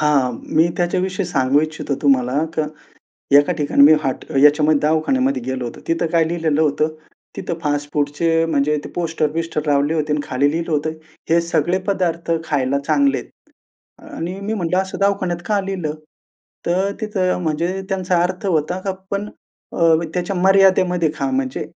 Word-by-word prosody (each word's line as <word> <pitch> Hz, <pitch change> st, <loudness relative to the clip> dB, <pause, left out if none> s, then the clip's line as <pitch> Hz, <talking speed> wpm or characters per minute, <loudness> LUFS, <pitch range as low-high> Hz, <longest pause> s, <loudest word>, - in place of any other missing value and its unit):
हां, 140 Hz, -5 st, +2 dB, 0.2 s
मी 165 Hz, +2 st, +5 dB
त्याच्याविषयी 185 Hz, +2 st, -1 dB
सांगू 140 Hz, -3 st, +2 dB
इच्छितो 155 Hz, -2 st, -3 dB
तुम्हाला 135 Hz, +1 st, +2 dB
का 155 Hz, -, +1 dB, 0.7 s
एका 145 Hz, +5 st, +2 dB
ठिकाणी 145 Hz, -1 st, +3 dB
मी 150 Hz, -, +9 dB
हट 135 Hz, -1 st, -2 dB
ह्याच्यामध्ये 150 Hz, +2 st, +5 dB
दवाखान्यामध्ये 260 Hz, -, +1 dB
गेलो 130 Hz, -1 st, -3 dB
होतो. 120 Hz, -, -7 dB
तिथे 165 Hz, 0 st, +1 dB
काय 165 Hz, 0 st, +2 dB
लिहिलेलं 160 Hz, -3 st, 0 dB
होतं 150 Hz, +1 st, +1 dB, 0.5 s
तिथे -, -, -3 dB
फास्टफूडचे 145 Hz, +2 st, 0 dB
म्हणजे 150 Hz, -1 st, +1 dB
ते -, -, -6 dB
पोस्टर-बिस्टर 165 Hz, -1 st, -2 dB
लावले 145 Hz, +2 st, +2 dB
होते 150 Hz, -1 st, -1 dB
आणि 150 Hz, -, 0 dB
खाली 140 Hz, +2 st, +1 dB
लिहिलं 165 Hz, +1 st, -3 dB
होतं. 150 Hz, +1 st, 0 dB, 0.4 s
हे 170 Hz, +1 st, +5 dB
सगळे 170 Hz, +1 st, 0 dB
पदार्थ 170 Hz, -4 st, -1 dB
खायला 140 Hz, -2 st, 0 dB
चांगले 280 Hz, -1 st, +2 dB
आहेत. -, -, -10 dB, 0.8 s
आणि 180 Hz, -, -4 dB
मी 210 Hz, +2 st, -3 dB
म्हंटलं 180 Hz, -3 st, 0 dB
असं 190 Hz, 0 st, -3 dB
दवाखान्यात 195 Hz, -3 st, +1 dB
का 205 Hz, -2 st, +1 dB
लिहिलं? 185 Hz, -6 st, -3 dB, 0.7 s
तर 185 Hz, +3 st, +1 dB
तिथं 190 Hz, -4 st, -1 dB
म्हणजे 170 Hz, +4 st, -1 dB
त्यांचा 185 Hz, -3 st, +1 dB
अर्थ 185 Hz, +2 st, -2 dB
होता, 175 Hz, +1 st, 0 dB, 0.3 s
पण 200 Hz, +1 st, -2 dB, 0.4 s
अ, -, -, -6 dB, 0.4 s
त्याच्या 180 Hz, +2 st, -2 dB
मर्यादेमध्ये 185 Hz, -3 st, +4 dB
खा 135 Hz, -3 st, -2 dB
म्हणजे 130 Hz, +2 st, -2 dB
165 Hz, 150 wpm, -19 LUFS, 145-185 Hz, 0.8 s, मी